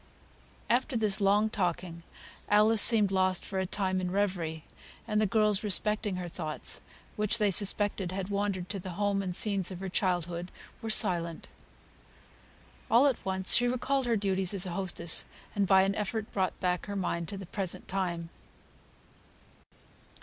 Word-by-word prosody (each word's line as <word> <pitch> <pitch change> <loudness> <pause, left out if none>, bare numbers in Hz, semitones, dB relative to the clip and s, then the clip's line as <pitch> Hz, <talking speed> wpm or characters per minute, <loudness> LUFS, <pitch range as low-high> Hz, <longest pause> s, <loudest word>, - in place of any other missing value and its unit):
After 245 +1 0
this 215 -2 +1
long 205 +2 +2
talking 175 -3 -3 0.5
Alice 210 +1 +4
seemed 215 -4 +4
lost 185 -1 0
for 190 - -4
a 190 - -2
time 185 -1 -1
in 180 - -3
reverie; 180 -5 -2 0.4
and 215 -1 0
the 215 - +2
girls, 210 0 +1
respecting 210 0 0
her 180 -1 -5
thoughts, 155 -2 -2 0.4
which 210 +2 +2
they 210 -3 +1
suspected 200 -1 +3
had 190 0 -5
wandered 200 -3 -2
to 200 0 -3
the 185 0 -7
home 200 -1 0
and 185 -2 -4
scenes 200 -3 +5
of 185 -2 -8
her 190 0 -5
childhood, 175 -2 -2 0.3
were 225 - -5
silent. 170 -5 +1 1.4
All 240 +5 +5
at 270 -4 0
once 190 -1 +2
she 245 - +5
recalled 255 +1 -1
her 230 -2 +1
duties 195 -1 0
as 190 - +2
hostess, 175 -2 0 0.3
and 200 -1 0
by 190 0 +5
an 195 +1 0
effort 210 +1 -4
brought 190 -2 -2
back 180 0 -2
her 200 - -5
mind 170 -3 -3
to 200 - -6
the 195 - -8
present 185 0 -2
time. 175 -3 -3
195 Hz, 160 wpm, -29 LUFS, 180-210 Hz, 1.4 s, scenes